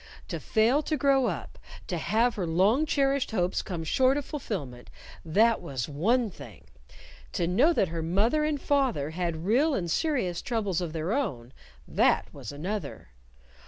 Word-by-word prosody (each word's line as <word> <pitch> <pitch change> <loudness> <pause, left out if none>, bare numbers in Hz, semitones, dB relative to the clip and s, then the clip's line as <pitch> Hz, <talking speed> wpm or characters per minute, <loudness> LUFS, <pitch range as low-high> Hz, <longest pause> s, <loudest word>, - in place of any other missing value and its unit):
To - - -3
fail 235 +6 +2
to 310 0 -2
grow 275 -3 +3
up, - - -5 0.3
to - - -3
have 230 +3 +2
her 185 -5 -3
long 200 - +3
cherished 275 -2 +1
hopes 180 -4 0
come 175 -5 -5
short 260 - +3
of 290 - -3
fulfillment 150 - -6 0.3
that 220 +8 +3
was 135 -8 -4
one 210 - +1
thing. 140 - -13 0.7
To 175 - 0
know 245 - +4
that 195 - +1
her 165 0 -4
mother 205 - +1
and 300 -1 0
father 260 - 0
had 170 -1 -3
real 270 +9 +3
and 175 -6 -2
serious 245 - 0
troubles 205 -7 -1
of 170 -3 -4
their 165 +5 -2
own, 135 - -3 0.3
that - - +2
was - - -8
another! 160 - -5
205 Hz, 160 wpm, -28 LUFS, 165-270 Hz, 0.7 s, know